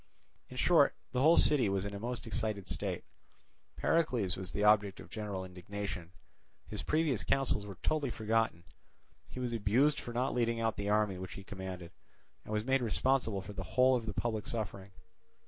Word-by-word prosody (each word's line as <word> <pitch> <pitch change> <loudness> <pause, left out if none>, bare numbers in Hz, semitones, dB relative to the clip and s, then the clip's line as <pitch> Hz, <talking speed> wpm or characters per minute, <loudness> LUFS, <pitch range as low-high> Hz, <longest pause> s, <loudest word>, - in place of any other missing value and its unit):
In - - -9
short, - - +5 0.2
the 125 - 0
whole 160 +4 +6
city 135 -8 +5
was 95 0 0
in 100 - -4
a 100 - -5
most 120 +2 -4
excited 110 -3 -2
state; - - -3 0.7
Pericles 125 - +1
was 95 -1 -5
the 105 - -1
object 105 -2 +4
of - - -12
general 105 -4 -4
indignation; 95 -1 -6 0.6
his 105 - -3
previous 155 -7 +1
counsels 135 -6 +1
were 100 -3 -8
totally 150 -4 +1
forgotten; 110 -6 0 0.7
he - - -7
was 125 -2 -2
abused 115 +7 +3
for 120 - -7
not 125 +3 0
leading 115 -1 +1
out 115 -1 0
the 100 0 -3
army 105 -3 +2
which 90 -3 -6
he 95 - -8
commanded, 95 -3 -7 0.5
and - - -9
was 105 0 -1
made 135 0 +2
responsible 120 -2 +1
for 105 - -8
the 95 - -5 0.2
whole 130 0 +6
of 115 -2 -3
the 105 - -2
public 110 -3 -2
suffering. 100 -4 -4
110 Hz, 180 wpm, -33 LUFS, 100-125 Hz, 0.7 s, whole